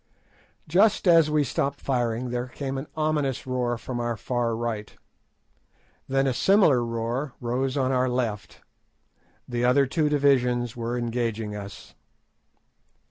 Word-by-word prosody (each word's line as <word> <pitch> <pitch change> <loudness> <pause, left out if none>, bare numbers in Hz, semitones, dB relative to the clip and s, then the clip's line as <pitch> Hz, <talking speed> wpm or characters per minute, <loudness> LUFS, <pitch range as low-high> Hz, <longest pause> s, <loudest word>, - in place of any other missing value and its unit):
Just 195 +5 +3
as 165 -3 +6
we 150 -1 +2
stopped 140 +2 -2
firing 120 -2 -1
there 125 +1 -2
came 135 +1 -4
an 140 - -7
ominous 150 -4 0
roar 125 -2 -1
from 120 +1 -5
our 120 -1 -2
far 120 0 -1
right, 110 -2 -4 1.1
then 135 0 +1
a 135 - +1
similar 155 - +4
roar 115 +4 -3
rose 130 +3 -1
on 130 -1 +1
our 130 0 +2
left. 115 -5 -3 0.9
The 120 -1 -3
two - - +2
other 135 +2 +4
divisions 135 -5 +1
were 120 +1 -3
engaging 115 -3 -2
us. 100 -1 -9
125 Hz, 135 wpm, -25 LUFS, 120-140 Hz, 1.1 s, as